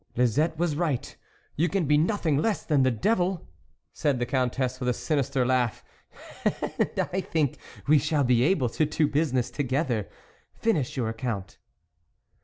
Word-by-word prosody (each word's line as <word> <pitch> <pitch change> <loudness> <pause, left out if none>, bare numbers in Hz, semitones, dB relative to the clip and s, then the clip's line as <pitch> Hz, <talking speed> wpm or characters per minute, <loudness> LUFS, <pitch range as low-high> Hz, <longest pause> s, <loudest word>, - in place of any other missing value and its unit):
" - - -38
Lisette 150 +7 +2
was 170 -2 0
right, 150 -6 -2 0.4
you 170 +4 +1
can 190 -2 0
be 150 +1 +3
nothing 160 -1 +1
less 200 +8 0
than 150 -4 +3
the 130 - +4
devil, 180 - 0 0.5
"said 145 -4 0
the 120 - -1
Countess 130 0 -1
with 125 -1 -1
a - - +2
sinister 140 -4 0
laugh, 125 -2 0 0.4
" - - -15
and - - -1
I 190 - +1
think 155 -7 -1 0.3
we 150 +1 +5
shall 145 0 +1
be 125 -2 +3
able 135 -3 +2
to 155 - +1
do 150 0 +1
business 140 -5 0
together.... 130 -6 -1 0.5
Finish 155 - 0
your 120 -3 0
account." 110 -5 -4
140 Hz, 165 wpm, -27 LUFS, 125-160 Hz, 0.5 s, we